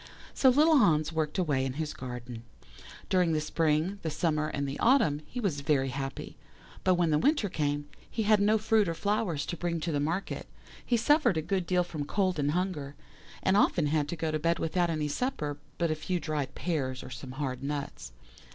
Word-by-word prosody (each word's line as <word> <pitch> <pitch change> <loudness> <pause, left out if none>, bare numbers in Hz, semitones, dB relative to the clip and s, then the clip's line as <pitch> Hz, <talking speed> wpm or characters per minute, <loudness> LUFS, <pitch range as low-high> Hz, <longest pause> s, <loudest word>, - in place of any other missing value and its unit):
"So 265 - +5
little 305 +4 +5
Hans 155 - +3
worked 155 0 -1
away 145 -8 +1
in 130 -1 -2
his 155 +2 -3
garden. 125 -2 -7 0.7
During 180 -3 +2
the 155 - +2
spring, 160 +5 0
the 160 - -2
summer, 155 -1 0
and 140 -2 -2
the 135 - -5
autumn 230 - +3
he 250 - -6
was 175 -11 -1
very 140 -2 +1
happy, 135 +1 -5 0.5
but 185 -1 +4
when 175 -2 +2
the 150 - +3
winter 285 - +2
came, 145 -4 -1
and 145 - -23
he 225 - -2
had 210 0 +4
no 210 +2 +4
fruit 220 -1 +2
or 165 - -2
flowers 200 -4 -1
to 175 - -4
bring 170 0 -2
to 170 - -2
the 145 - 0
market, 165 +7 -2 0.4
he 240 - +1
suffered 245 - +3
a - - +1
good 185 0 -1
deal 180 -1 +2
from 155 -4 -5
cold 185 0 0
and 145 0 +1
hunger, 165 -6 -2 0.5
and 190 - +3
often 175 -5 +3
had 145 0 0
to 170 - -2
go 160 -1 -2
to 155 - -1
bed 165 +2 +1
without 170 +2 0
any 155 -2 -1
supper 150 - -2 0.2
but 170 -2 +1
a - - +1
few 175 +4 -2
dried 145 -5 -3
pears 135 -7 -2
or - - -9
some 125 +1 -7
hard 135 -2 -3
nuts. 140 - -4
160 Hz, 210 wpm, -29 LUFS, 145-190 Hz, 0.7 s, So